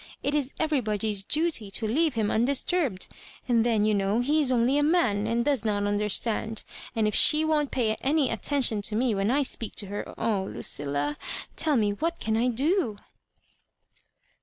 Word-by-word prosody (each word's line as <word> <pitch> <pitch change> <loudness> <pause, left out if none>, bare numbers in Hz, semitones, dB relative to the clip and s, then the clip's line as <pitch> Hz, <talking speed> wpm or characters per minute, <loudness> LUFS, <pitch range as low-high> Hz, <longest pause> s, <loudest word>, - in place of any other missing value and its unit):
It 285 - 0
is 285 -2 0
everybody's 220 -9 0
duty 300 - 0
to 220 +3 -1
leave 300 +5 +1
liira 215 -2 0
undisturbed; 265 - 0 0.4
and 235 -3 +3
then, 225 -3 +2
you 215 - +2
know, 200 +1 +1
he 295 +5 +2
is 265 -3 +2
only 250 +3 +2
a - - +2
man, 290 - +2
and 235 +1 0
does 275 -7 +1
not 205 -2 0
understand; 210 +2 0 0.3
and 220 -2 +1
if 210 - -1
she 310 +7 +5
won't 300 -2 +1
pay 230 -4 0
any 280 -1 +1
attention 230 -1 +1
to 210 +1 -1
me 240 0 +1
when 195 +1 0
I 280 +4 +2
speak 230 -4 -3
to 205 - 0
her, 205 - -5
oh, 220 -4 0
Lucilla, 145 -3 -2 0.4
tell 305 -4 +1
me, 210 -2 +2
what 330 +11 -3
can 220 0 -1
I 235 +3 +1
do 265 - 0
230 Hz, 180 wpm, -26 LUFS, 210-285 Hz, 0.4 s, she